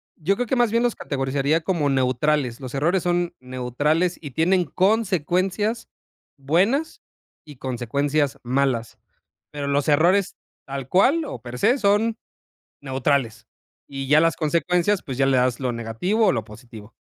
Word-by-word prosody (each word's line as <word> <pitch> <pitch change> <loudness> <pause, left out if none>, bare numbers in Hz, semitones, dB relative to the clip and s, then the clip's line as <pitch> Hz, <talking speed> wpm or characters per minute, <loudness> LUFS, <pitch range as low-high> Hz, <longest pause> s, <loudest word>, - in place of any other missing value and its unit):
yo 185 +5 0
creo 245 - -2
que 260 - 0
más 240 -3 +2
bien 230 +1 +2
los 240 - 0
categorizaría 140 +3 -1
como 160 -4 -1
neutrales, 130 0 0
los 130 0 -7
errores 170 +6 +1
son 175 -1 0
neutrales. 130 +8 -1
Y 145 -4 -8
tienen 180 +5 +2
consecuencias 195 +3 0 0.5
buenas 195 - 0 0.4
y 145 -4 -13
consecuencias 140 +4 -1
malas, 125 -2 -1 0.5
pero 145 -1 -5
los 140 +1 0
errores 175 +6 +3 0.3
tal 135 -1 -6
cual, 275 - +3
o 125 - -7
per 125 0 -8
se, 245 +6 +3
son 215 +1 +2 0.6
neutrales, 130 -4 -1 0.4
y 135 -1 -6
ya 150 +2 +5
las 165 -1 +2
consecuencias, 175 +5 0
pues 130 -2 -6
ya 135 - +3
le 130 -1 +3
das 125 0 +1
lo 125 -2 -1
negativo 120 - 0
o - - +5
lo 115 -4 -2
positivo. 110 -1 -13
150 Hz, 150 wpm, -23 LUFS, 130-185 Hz, 0.6 s, ya